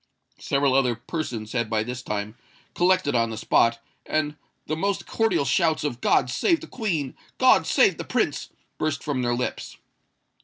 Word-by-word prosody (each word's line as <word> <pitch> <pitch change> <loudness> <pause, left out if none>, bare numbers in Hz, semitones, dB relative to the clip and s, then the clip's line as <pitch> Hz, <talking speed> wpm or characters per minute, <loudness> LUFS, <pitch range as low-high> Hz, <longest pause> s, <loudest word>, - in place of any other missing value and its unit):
Several 140 -1 +1
other 130 -3 +3
persons 120 -4 -5
had 115 -3 -1
by 110 -1 +1
this 125 +2 -5
time 105 -1 -4 0.4
collected 185 -4 +2
on 115 -1 +2
the 110 - -5
spot; 115 +2 +3 0.3
and 155 -1 -1 0.3
the 155 - -2
most 195 +4 -1
cordial 225 -10 +1
shouts 155 +5 +2
of 125 -5 -3
"God 125 - +3
save 330 - +1
the - - -7
Queen!" 165 - -3 0.2
"God - - +5
save - - +3
the - - -3
Prince!" - - -1 0.3
burst 155 0 -1
from 145 -4 -1
their 120 -1 0
lips. 125 - -4
135 Hz, 165 wpm, -24 LUFS, 120-155 Hz, 0.4 s, God